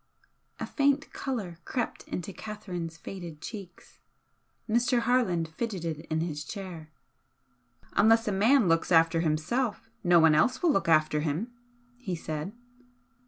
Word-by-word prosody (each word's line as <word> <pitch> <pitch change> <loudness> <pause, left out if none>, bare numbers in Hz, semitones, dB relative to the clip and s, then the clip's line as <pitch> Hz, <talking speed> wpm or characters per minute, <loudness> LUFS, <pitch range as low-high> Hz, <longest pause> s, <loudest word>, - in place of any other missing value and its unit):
A - - -2
faint 280 -1 +1
colour 205 -11 -4
crept 245 -3 -3
into 180 +2 -5
Catherine's 180 -7 -6
faded 170 -3 -8
cheeks. 195 -2 -10 0.7
Mr. 240 +2 +2
Harland 225 -10 +1
fidgeted 165 -5 -4
in 160 0 0
his 150 -3 -3
chair. 175 -2 -7 1.0
"Unless 225 +2 +4
a - - +2
man 220 +4 +4
looks 165 +1 +2
after 165 0 +5
himself, 205 +9 -1
no 175 -1 +6
one 160 -1 +6
else 200 - +2
will 340 - +5
look 195 - +1
after 155 -1 +4
him" 160 +11 -2 0.5
he 190 -8 -3
said. 155 +2 -4
180 Hz, 130 wpm, -29 LUFS, 165-225 Hz, 1.0 s, no